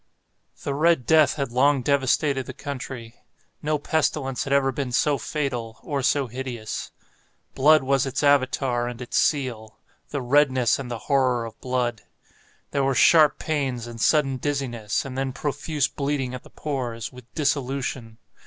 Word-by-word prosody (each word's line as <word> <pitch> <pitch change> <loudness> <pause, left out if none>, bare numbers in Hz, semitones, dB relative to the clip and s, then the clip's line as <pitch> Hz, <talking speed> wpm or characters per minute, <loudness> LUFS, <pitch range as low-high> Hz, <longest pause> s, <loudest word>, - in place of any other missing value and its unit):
The 140 - -2
"Red 155 -2 +2
Death" 160 -2 +5
had 140 -4 -3
long 135 +2 +3
devastated 135 0 +1
the - - -7
country. 125 -4 -7 0.4
No 150 0 0
pestilence 145 -3 -1
had 135 - -5
ever 140 -1 +3
been 130 -1 -3
so 140 +3 +2
fatal, 120 -5 -3
or 140 -3 -2
so 140 +2 +2
hideous. 120 -3 -5 0.6
Blood 150 +1 +5
was 135 0 +1
its 135 +2 -2
Avatar 130 -3 +2
and 120 -1 -6
its 125 - -6
seal—the 130 0 -2
redness 130 -2 +3
and 130 -2 -6
the 120 - -3
horror 130 -4 +2
of 115 -1 -11
blood. 125 -3 -1 0.7
There 140 - +1
were 135 -1 +1
sharp 155 +3 +6
pains, 135 -6 -2
and 115 -1 -8
sudden 135 -2 +3
dizziness, 125 -7 -2
and 130 -2 -6
then 135 -1 -2
profuse 145 0 -1
bleeding 140 -3 -2
at 125 - -6
the - - -17
pores, 125 -6 -4
with 125 -1 -14
dissolution. 135 -5 -2
135 Hz, 155 wpm, -24 LUFS, 125-145 Hz, 0.7 s, sharp